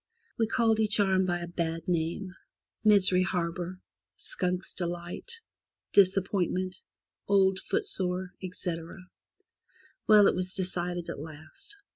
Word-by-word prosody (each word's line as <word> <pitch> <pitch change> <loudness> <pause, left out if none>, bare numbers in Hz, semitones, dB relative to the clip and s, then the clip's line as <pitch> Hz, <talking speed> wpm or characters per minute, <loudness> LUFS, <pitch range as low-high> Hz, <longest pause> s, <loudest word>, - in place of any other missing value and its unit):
We 225 - +3
called 225 -1 +2
each 215 -1 +2
arm 190 -2 +3
by 175 -1 -1
a 170 - -5
bad 165 -1 -3
name 175 +2 -1 0.3
— - - -58
Misery 195 -4 +5
Harbour, 180 0 -2 0.4
Skunk's 180 -1 -3
Delight, 175 - -5 0.5
Disappointment, 185 -1 +2 0.5
Old 190 -1 +4
Footsore, 190 - 0
etc. 175 -3 -5 1.1
Well, 210 -2 +8
it - - +5
was 185 0 -3
decided 175 -2 -2
at - - -7
last. 155 - -9
185 Hz, 115 wpm, -29 LUFS, 175-195 Hz, 1.1 s, Well